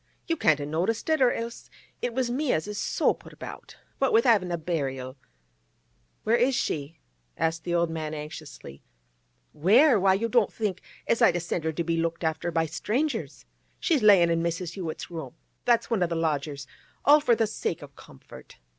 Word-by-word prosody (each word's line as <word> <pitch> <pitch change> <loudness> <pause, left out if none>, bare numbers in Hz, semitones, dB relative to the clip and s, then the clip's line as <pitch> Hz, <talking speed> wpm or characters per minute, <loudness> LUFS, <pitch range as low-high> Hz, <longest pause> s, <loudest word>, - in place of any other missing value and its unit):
You 330 - 0
can't 155 - +3
a 145 - -3
noticed 170 +9 -1
it, 315 -3 +2
or 250 -2 +5
else 230 0 -6 0.3
it 245 - -1
was 245 0 -1
me 275 +2 0
as 155 - -1
is 210 -1 -4
so - - +1
put - - -15
about. - - -10 0.2
What 270 - +2
with 230 - +5
havin' 205 -8 +3
a 170 - 0
burial—' 135 -6 -3 1.1
'Where 225 - +3
is 250 +2 +2
she?' 150 -4 -2 0.4
asked 165 0 -1
the 175 -1 0
old 170 -1 +1
man 155 -1 -4
anxiously. 150 - -9 0.7
'Where? 225 - +5
Why, 190 0 +4
you 225 +4 -1
don't 230 -2 +2
think 205 -5 -3 0.2
as 230 - +1
I'd 175 - +5
a - - +1
sent 170 -1 -3
her 160 - 0
to 170 - -2
be 165 0 -1
looked 165 +1 -2
after 160 +1 -1
by 165 -1 +1
strangers? 215 - -2 0.3
She's 315 -7 +1
layin' 195 -5 +6
in 165 0 +1
Mrs. 170 0 -3
Hewett's 175 -3 -6
room—that's 170 - -2
one 220 -5 +1
o' 175 - +3
the 170 - -3
lodgers—all 150 - 0
for 250 -6 +3
the 225 - +2
sake 190 -7 -3
o' - - -8
comfort. 70 - -15
175 Hz, 190 wpm, -27 LUFS, 160-230 Hz, 1.1 s, layin